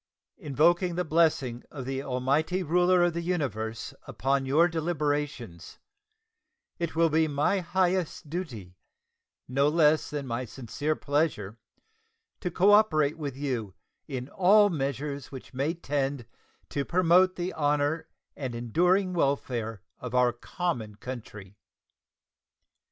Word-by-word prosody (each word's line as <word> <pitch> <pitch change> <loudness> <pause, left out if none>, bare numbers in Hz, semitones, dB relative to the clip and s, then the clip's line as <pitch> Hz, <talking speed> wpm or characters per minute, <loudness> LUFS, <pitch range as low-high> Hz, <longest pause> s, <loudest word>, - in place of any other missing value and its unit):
Invoking 170 +3 +2
the 180 0 -1
blessing 150 -7 +1
of 135 -4 -7
the 135 +1 -3
Almighty 140 +8 0
Ruler 180 +2 +3
of 175 -1 +2
the 170 - -2
Universe 115 - -3
upon 135 0 0
your 155 +6 +4
deliberations, 145 - -3 1.0
it 170 -2 -3
will 165 -1 +3
be 160 +1 +3
my 150 +7 +1
highest 180 -2 0
duty, 120 - -6 0.7
no 140 +3 +2
less 155 -1 +3
than 145 -2 -4
my 120 0 -3
sincere 130 +6 -3
pleasure, 140 -9 -1 0.8
to 180 - -2
cooperate 175 -5 +4
with 140 -4 -4
you 120 -9 -3 0.3
in 130 -3 -5
all 205 +2 +5
measures 140 -1 -3
which 135 0 -10
may 140 +6 -1
tend 140 -5 -2 0.4
to 140 - -1
promote 185 +3 +4
the 180 +1 -3
honor 145 +1 0 0.3
and 130 -4 -5
enduring 180 - +2
welfare 125 - -1 0.2
of 125 0 -5
our 125 -1 +4
common 120 - -4
country. 105 -5 -9
145 Hz, 120 wpm, -28 LUFS, 125-170 Hz, 1.0 s, all